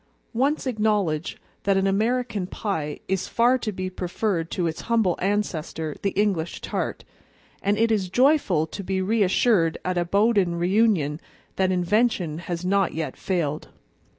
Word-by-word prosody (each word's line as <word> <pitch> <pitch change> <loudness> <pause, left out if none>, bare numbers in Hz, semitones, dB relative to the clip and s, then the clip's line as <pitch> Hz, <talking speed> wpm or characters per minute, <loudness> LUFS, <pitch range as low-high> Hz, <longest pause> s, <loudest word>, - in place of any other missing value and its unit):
Once 275 +7 +1
acknowledge 210 - 0 0.2
that 195 -1 +2
an 195 - +2
American 215 0 0
pie 160 -8 -3
is 190 -1 -1
far 245 +2 +3
to 220 - -3
be 185 -1 -4
preferred 180 -1 -2
to 180 - -1
its 160 -1 -3
humble 220 -7 +3
ancestor, 170 -6 -2
the 200 - +1
English 185 -6 0
tart, - - -3 0.6
and 205 +1 +1
it 225 +1 +2
is 195 -4 0
joyful 245 - +3
to 195 +5 -7
be 190 0 -1
reassured 195 -3 +2
at 180 -1 0
a - - +2
Bowden 200 -1 +2
reunion 175 -4 +2 0.3
that 190 -1 +2
invention 180 -3 +1
has 175 0 -5
not 195 -2 +1
yet 160 -1 -3
failed. 160 -6 -2
190 Hz, 150 wpm, -24 LUFS, 170-215 Hz, 0.6 s, far